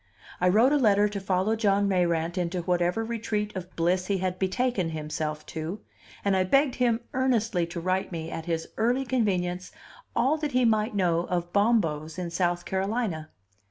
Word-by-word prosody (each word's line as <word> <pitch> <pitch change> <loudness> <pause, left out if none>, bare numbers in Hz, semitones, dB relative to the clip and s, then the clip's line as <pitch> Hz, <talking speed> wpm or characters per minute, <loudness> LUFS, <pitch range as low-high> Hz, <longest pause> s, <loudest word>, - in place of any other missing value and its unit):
I 180 - +3
wrote 225 +8 +5
a 295 - +4
letter 210 -5 +4
to 205 -1 -4
follow 195 +3 +1
John 200 -2 +2
Mayrant 170 -3 +1
into 180 -1 -2
whatever 180 +5 +1
retreat 215 -2 -2
of 185 -1 -7
bliss 180 +2 +1
he 200 - +1
had 185 0 -2
betaken 190 -1 0
himself 155 0 -4
to, 165 +7 -4 0.4
and 200 -1 +3
I 190 - +3
begged 275 +8 +3
him 240 -2 +2
earnestly 230 -9 +1
to 170 +1 -5
write 185 +3 -1
me 165 -1 -5
at 160 - -5
his 165 -1 -2
early 245 +4 +1
convenience 185 -8 -1 0.4
all 275 +6 +2
that 300 -3 -3
he 250 -1 +3
might 220 0 +2
know 175 -3 +2
of 175 -1 -2
Bombos 165 -8 +1
in 175 -2 -4
South 175 0 0
Carolina. 190 -5 -2
190 Hz, 175 wpm, -27 LUFS, 175-225 Hz, 0.4 s, wrote